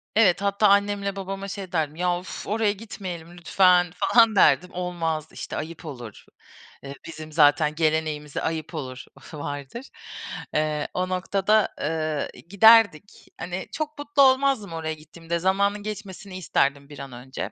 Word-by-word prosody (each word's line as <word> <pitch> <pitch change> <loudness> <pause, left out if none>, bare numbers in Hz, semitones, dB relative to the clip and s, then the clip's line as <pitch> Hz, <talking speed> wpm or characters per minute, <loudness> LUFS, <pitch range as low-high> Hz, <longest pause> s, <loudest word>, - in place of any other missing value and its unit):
Evet, 200 -4 +4
hatta 200 +1 +2
annemle 200 0 +2
babama 195 0 -5
şey 195 -2 -7
derdim, 155 -3 -1
"Ya, 180 0 0
uf, 180 - -8
oraya 215 0 +1
gitmeyelim 180 -5 -8
lütfen." 180 0 +3
falan 230 -1 +4
derdim. 180 -1 +4
"Olmaz, 165 -3 -3
işte, - - -7
ayıp 165 +2 -7
olur." 120 -8 -9 0.6
Eee, 140 0 -7
bizim 155 -1 -9
zaten 150 0 +4
geleneğimize 155 -2 -1
"ayıp 160 +1 -3
olur" 130 -4 -6 0.3
vardır. 145 - -6 0.6
Eee, 150 -1 0
o 185 0 -1
noktada, 195 +3 +1
ııı, 155 -1 -1 0.2
giderdik. 205 -3 +5
Hani, 180 +1 -5
çok 305 -1 -4
mutlu 290 -1 +1
olmazdım 260 -8 +3
oraya 160 -1 -3
gittiğimde. 165 +2 -6
Zamanın 200 +3 +1
geçmesini 200 -2 -7
isterdim 140 -5 0
bir 145 - -11
an 135 -1 -8
önce. 125 +2 -7
180 Hz, 140 wpm, -24 LUFS, 155-200 Hz, 0.6 s, giderdik